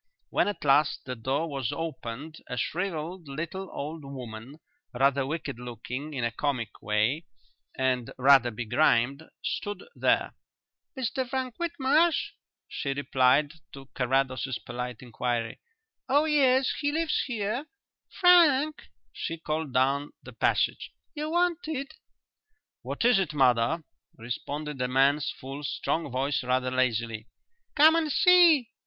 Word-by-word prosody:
When - - +2
at 205 - -4
last 140 +2 +3
the 125 0 -4
door 135 +8 -1
was 135 -6 -3
opened 155 -1 -6
a 125 - -5
shrivelled 170 - -3
little 170 +7 -5
old 155 +2 -6
woman, 130 0 -9 0.4
rather 135 +1 +2
wicked 150 -4 -4
looking 125 +5 -6
in 125 - -2
a 120 - 0
comic 120 -3 -2
way, 110 +10 0 0.5
and 130 -2 0
rather 135 -1 +6
begrimed, 120 +4 +1 0.2
stood 205 -2 -3
there. - - +1 0.6
"Mr 260 0 -2
Frank 260 -2 -3
Whitmarsh?" 320 0 +1 0.4
she 140 - -3
replied 140 +1 +2 0.2
to 135 -1 -11
Carrados's 130 0 0
polite 125 0 -6
inquiry; 120 -1 -3 0.5
"oh 290 +3 +4
yes, 265 -4 +3
he 290 0 0
lives 320 0 0
here. 235 +4 -2 0.4
Frank," 310 -5 +4 0.3
she 165 - -4
called 155 -2 -3
down 135 +3 +1
the - - -11
passage, - - 0 0.2
"you're 305 0 -4
wanted." 325 -5 -1 0.9
"What - - -3
is 245 -5 +5
it, 175 -6 -2
mother?" 130 +4 +3 0.3
responded 140 +4 -5
a 125 - +1
man's 135 +3 +3
full, 135 +3 -7
strong 160 +2 -2
voice 135 +2 -1
rather 125 0 0
lazily. 115 -3 -1 0.5
"Come 310 +2 +7
and 320 -2 +1
see!" 335 -10 +6
145 Hz, 125 wpm, -27 LUFS, -, 0.9 s, Come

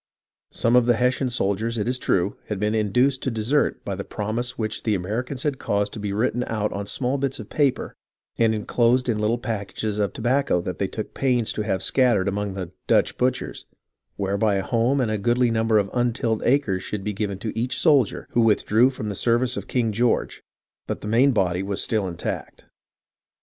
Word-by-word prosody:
Some 115 +1 +1
of 125 -1 +5
the 120 - +4
Hessian 125 +2 +1
soldiers, 115 0 -1
it 105 - -1
is 125 +1 0
true, 95 -3 +1
had 105 - -3
been 105 +2 0
induced 125 +5 +2
to - - -1
desert 115 +5 0
by 100 - -2
the 100 +1 -4
promise 115 +5 -3
which 110 -1 -3
the 110 -2 +1
Americans 120 +8 -3
had 145 -3 -1
caused 100 0 -1
to 110 - -6
be 105 -1 -3
written 115 +4 0
out 105 -1 -1
on 100 0 -4
small 130 +4 -1
bits 135 -1 -1
of 110 -3 -10
paper 140 -4 0 0.4
and 110 -1 +2
enclosed 120 +4 +1
in 110 -3 0
little 110 +3 +1
packages 105 -2 -3
of 100 -2 +1
tobacco 125 -4 +1
that 90 0 -5
they 100 - 0
took 110 +2 -6
pains 125 -4 +1
to - - -3
have 95 -3 -1
scattered 120 -7 +3
among 100 0 -2
the 90 -3 -5
" - - -51
Dutch - - +3
butchers," 130 0 -2 0.5
whereby 100 +1 0
a 95 - 0
home 120 +7 +1
and 120 -4 +1
a 110 - -1
goodly 120 +3 +2
number 110 -1 +2
of 100 -2 0
untilled 120 -2 0
acres 120 -8 +2
should 100 +1 -5
be 105 - -2
given 100 -1 -3
to 110 +2 -5
each 120 +3 -1
soldier 140 - +3
who 120 - +2
withdrew 115 +2 +4
from 130 -5 -6
the 105 - -2
service 120 +4 +1
of - - -5
King 120 -3 0
George; 115 +3 0 0.5
but - - -4
the - - -6
main 125 +6 +4
body 95 -6 +1
was 100 0 -2
still 105 -4 0
intact. 85 -2 -5
110 Hz, 205 wpm, -23 LUFS, 100-125 Hz, 0.5 s, of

